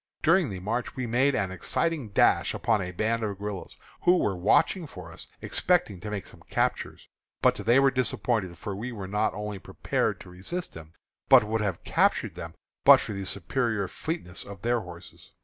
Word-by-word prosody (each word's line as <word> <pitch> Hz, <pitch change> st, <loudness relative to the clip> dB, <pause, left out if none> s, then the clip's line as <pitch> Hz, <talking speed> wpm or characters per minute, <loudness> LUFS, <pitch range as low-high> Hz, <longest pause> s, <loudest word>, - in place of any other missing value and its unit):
During 170 Hz, -1 st, +4 dB
the 95 Hz, -2 st, -5 dB
march 115 Hz, +6 st, -3 dB
we 130 Hz, -2 st, -3 dB
made 130 Hz, +4 st, +2 dB
an 95 Hz, -3 st, -1 dB
exciting 140 Hz, -, -1 dB
dash 100 Hz, -, +3 dB
upon 110 Hz, -3 st, +1 dB
a 90 Hz, -1 st, -4 dB
band 110 Hz, +5 st, 0 dB
of 105 Hz, -3 st, -3 dB
guerillas, 100 Hz, -1 st, -6 dB, 0.2 s
who 180 Hz, +1 st, +5 dB
were 100 Hz, -, 0 dB
watching 160 Hz, -, +2 dB
for 90 Hz, -10 st, -10 dB
us, 85 Hz, -, -10 dB, 0.2 s
expecting 165 Hz, -, +1 dB
to 105 Hz, +4 st, -6 dB
make 105 Hz, -3 st, -4 dB
some -, -, -14 dB
captures. -, -, -1 dB, 0.4 s
But -, -, +6 dB
they 120 Hz, +4 st, +3 dB
were 135 Hz, 0 st, +4 dB
disappointed, 115 Hz, -7 st, -1 dB
for 100 Hz, -, -5 dB
we 115 Hz, +6 st, -5 dB
were 100 Hz, -5 st, -6 dB
not 105 Hz, +3 st, 0 dB
only 105 Hz, -1 st, -5 dB
prepared -, -, -2 dB
to 90 Hz, -, -12 dB
resist 135 Hz, -, -4 dB
them, 80 Hz, 0 st, -11 dB, 0.4 s
but -, -, +8 dB
would 110 Hz, +1 st, -1 dB
have 100 Hz, -5 st, -2 dB
captured -, -, +1 dB
them -, -, -8 dB, 0.3 s
but -, -, +9 dB
for 105 Hz, -, -5 dB
the 100 Hz, -1 st, -5 dB
superior 110 Hz, +1 st, -1 dB
fleetness 155 Hz, -, -5 dB
of 100 Hz, -3 st, -11 dB
their 120 Hz, 0 st, +2 dB
horses. 90 Hz, -4 st, -12 dB
105 Hz, 190 wpm, -27 LUFS, 95-125 Hz, 0.4 s, but